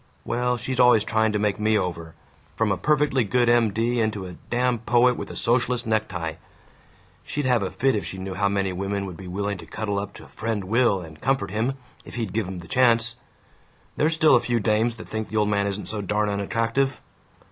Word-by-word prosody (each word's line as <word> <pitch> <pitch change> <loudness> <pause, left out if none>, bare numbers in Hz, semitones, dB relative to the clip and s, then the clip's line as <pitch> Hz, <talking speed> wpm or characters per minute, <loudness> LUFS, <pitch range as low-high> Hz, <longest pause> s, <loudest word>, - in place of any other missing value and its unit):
Well, 125 +1 0
she's 125 +2 -4
always 125 -4 +6
trying 110 0 +1
to - - +1
make 105 0 0
me 110 0 +3
over, 85 -4 -4 0.4
from 110 -2 +1
a - - +2
perfectly 145 0 +2
good 120 +4 +2
M. 120 -2 +4
D. 115 +4 0
into 110 -3 -1
a 90 - -8 0.2
damn 125 0 +1
poet 120 +2 +3
with - - -6
a - - -8
socialist 120 +1 +1
necktie! 90 -7 -2 0.9
She'd 145 -1 -3
have 125 -3 +3
a 95 - -1
fit 135 0 +1
if 105 - -1
she 95 - -7
knew 95 0 -5
how 100 +1 +1
many 100 -2 0
women 100 +2 -2
would 90 -3 -7
be 95 +2 -10
willing 100 +2 -3
to - - -11
cuddle 100 -2 -2
up 100 0 -6
to - - -11
Friend 110 -2 -3
Will 110 -1 +2
and 80 -2 -12
comfort 135 -7 0
him, 115 +6 0 0.3
if - - -11
he'd 115 -6 -3
give 110 -4 -1
'em 95 0 -6
the 85 -1 -9
chance! 115 +1 +3 0.8
There's 160 +2 +2
still 160 -1 +5
a - - +6
few 120 0 0
dames 110 +2 +1
that 115 - -10
think 110 0 -4
the 110 - -3
old 105 -1 +2
man 100 -1 +1
isn't 100 +1 -4
so 110 -1 -2
darn 105 +2 0
unattractive! 115 +6 0
110 Hz, 220 wpm, -24 LUFS, 100-120 Hz, 0.9 s, always